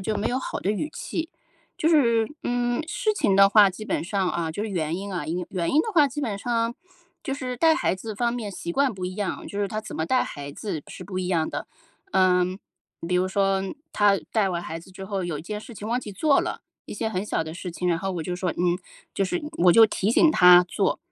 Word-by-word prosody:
就 215 +3 -2
没 205 - -1
有 250 - 0
好 - - -4
的 200 - 0
语 215 +8 -2
气。 325 0 -4 0.5
就 320 - +2
是， 235 -8 +4 0.2
嗯， 245 +2 0
事 430 +6 0
情 200 - +2
的 195 0 +7
话， 205 -1 +7
基 195 +3 -7
本 - - -1
上 190 +1 -1
啊， 165 -2 -2
就 185 +6 -4
是 220 - -3
原 165 -3 -1
因 200 +1 -6
啊， 175 - -3
因 175 +2 -3
原 170 -3 -1
因 310 - +5
的 445 - -4
话 300 -5 +5
基 290 +3 -5
本 215 -7 -2
上 230 +1 -1 0.5
就 270 -3 -3
是 255 -3 -4
带 320 +5 +4
孩 340 - +1
子 215 +3 -7
方 235 +3 0
面 230 -4 -4
习 170 -3 -5
惯 275 -1 +2
不 185 -1 -5
一 185 +1 -5
样， 205 -3 -3
就 200 - -4
是 200 - 0
他 215 - -4
怎 215 - -7
么 160 - -2
带 255 +5 +2
孩 145 -1 -7
子 160 0 -5
是 - - -9
不 185 -2 -5
一 185 - -2
样 170 -3 0
的。 - - -5 0.5
嗯， 185 0 +3 0.5
比 180 - -1
如 180 +1 +2
说 195 0 +1 0.3
他 205 -1 +4
带 210 -4 +2
完 175 -1 -2
孩 165 -1 -6
子 180 - -16
之 190 +1 -9
后， 195 -1 -3
有 170 -4 -3
一 150 - -8
件 210 +3 -5
事 235 - -11
情 210 - -7
忘 240 +3 0
记 215 - -8
做 280 +9 +3
了， - - -4 0.2
一 - - -7
些 220 - -2
很 185 -3 -2
小 165 - -1
的 160 - -7
事 175 +1 -6
情， 180 +2 -4
然 170 -2 +2
后 195 - -3
我 175 -3 -3
就 180 +3 -3
说， 180 0 -1
嗯， 175 0 0 0.3
就 - - -1
是 185 -2 -1 0.2
我 180 - +8
就 225 +5 +8
提 205 -1 0
醒 315 +7 +5
他 180 - +7
做。 - - 0
200 Hz, 275 characters per minute, -25 LUFS, 180-235 Hz, 0.5 s, 我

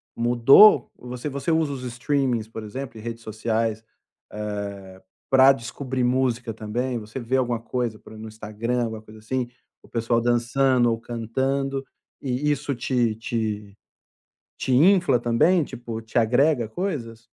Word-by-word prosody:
mudou? 120 - +6
Você 125 +3 -6
você 140 +3 -2
usa 160 -3 +1
os 130 -2 -7
streamings, 125 -2 -1
por 110 0 -8
exemplo, 120 +3 -7
e - - -9
redes 115 0 -6
sociais, 110 0 -2 0.5
eh, 100 -3 -6 0.3
para 135 0 +8
descobrir 130 +1 -3
música 125 -2 0
também? 120 +4 -3
Você 110 +4 -7
vê 125 +2 0
alguma 120 -3 0
coisa 115 -1 -3
por 110 - -15
e - - -11
no 110 +1 -8
Instagram, 110 +3 -3
alguma 110 -2 -4
coisa, 110 0 -14
assim, 125 +3 -2 0.3
o - - -19
pessoal 115 0 0
dançando 120 +1 +2
ou 115 - -2
cantando 135 +4 -2 0.4
e 135 +3 0
isso 145 -1 -2
te 120 -2 0
te 105 -3 -4 0.8
te - - -2
infla 175 -1 +5
também, 120 +10 +3
tipo, 115 -3 -7
te 110 +2 -5
agrega 120 +1 +3
coisas? 115 - -4
120 Hz, 150 wpm, -24 LUFS, 110-130 Hz, 0.8 s, para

